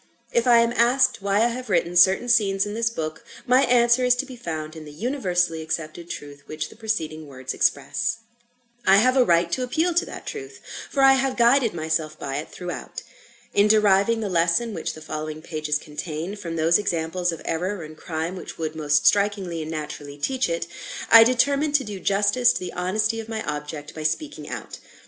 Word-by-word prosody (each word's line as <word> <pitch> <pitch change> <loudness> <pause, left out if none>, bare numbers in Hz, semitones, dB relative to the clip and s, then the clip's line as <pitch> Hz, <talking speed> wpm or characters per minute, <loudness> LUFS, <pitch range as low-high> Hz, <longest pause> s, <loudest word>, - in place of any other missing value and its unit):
If 235 +1 +1
I 235 -1 +7
am 235 0 +1
asked 250 0 +3
why 200 +2 +2
I 240 - +3
have 250 0 -6
written 175 -2 +1
certain 190 +6 +5
scenes 205 -5 +3
in 205 - -5
this 225 +1 0
book, 160 -7 -5 0.2
my 255 +2 +4
answer 240 0 +4
is 250 -1 +4
to 250 - -3
be 260 -2 -10
found 160 -8 -6
in 160 - -9
the 150 - -11
universally 180 - -1
accepted 160 +1 -5
truth 145 -2 -8
which 155 0 -5
the - - -15
preceding 160 -9 -3
words 130 -2 -6
express. - - 0 0.7
I 195 +1 +7
have 255 +5 +4
a 260 - +5
right 170 -3 +2
to 260 - -1
appeal 320 +8 0
to 345 - +2
that - - -9
truth; 405 -2 -7 0.3
for 275 - +1
I 270 0 +5
guided 235 -2 +3
myself 155 -1 -2
by 135 0 -4
it 150 - -5
throughout. 180 -1 -7 0.5
In 205 +1 +4
deriving 210 +1 +3
the 215 - -2
lesson 175 +6 +1
which 165 - -4
the 155 - -11
following 155 0 -6
pages 155 -2 -2
contain, 155 +5 -6
from 175 -5 -6
those 165 +3 +3
examples 175 -2 -1
of 165 - -8
error 180 +3 -2
and 155 0 -10
crime 160 +3 -4
which 185 - -9
would 160 -1 -4
most 150 -1 +1
strikingly 200 -5 +2
and 155 - -6
naturally 150 -2 -6
teach 260 - -1
it, 170 0 -2 0.5
I 230 0 +11
determined 280 +5 +2
to 285 - +3
do 210 -4 -7
justice 205 +6 +3
to - - -3
the 180 - -6
honesty 210 +5 0
of 225 0 -8
my 220 -1 -3
object 150 0 -6
by 155 - -7
speaking 285 - -3
out. - - -7
190 Hz, 200 wpm, -23 LUFS, 160-235 Hz, 0.7 s, I